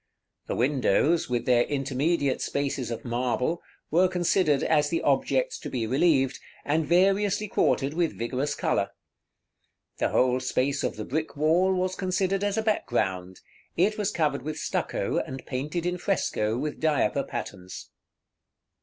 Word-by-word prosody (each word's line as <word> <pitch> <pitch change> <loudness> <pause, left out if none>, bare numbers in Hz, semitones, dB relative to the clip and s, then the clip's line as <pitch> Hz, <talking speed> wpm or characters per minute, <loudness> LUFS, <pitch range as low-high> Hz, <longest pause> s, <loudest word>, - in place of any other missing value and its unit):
The - - -2
windows, 140 +5 +2
with 120 -1 -1
their 125 -1 +4
intermediate 140 +1 0
spaces 140 -3 -2
of 115 +1 -5
marble, 125 +6 -1 0.3
were 180 +4 +5
considered 175 -4 +2
as 150 -2 +2
the 165 - -1
objects - - +1
to - - -6
be 120 -4 -2
relieved, 135 +1 +2 0.3
and 155 +1 +1
variously 195 +4 +3
quartered 140 -6 +1
with 170 0 -1
vigorous 130 +5 -2
color. - - 0 1.1
The - - +1
whole 125 0 +2
space 130 +2 0
of - - -1
the 110 - -5
brick 155 +1 -3
wall 170 +5 +3
was 185 0 0
considered 190 +1 0
as 205 +1 0
a 220 - +1
background; 95 - -1 0.4
it 210 +5 +2
was 205 - +1
covered 150 -4 0
with 155 +1 -5
stucco, - - -2
and 130 0 -4
painted 150 +6 -3
in 180 0 -1
fresco, 115 - 0
with 150 +3 -3
diaper 155 -4 +1
patterns. 90 0 -7
150 Hz, 145 wpm, -26 LUFS, 130-180 Hz, 1.1 s, were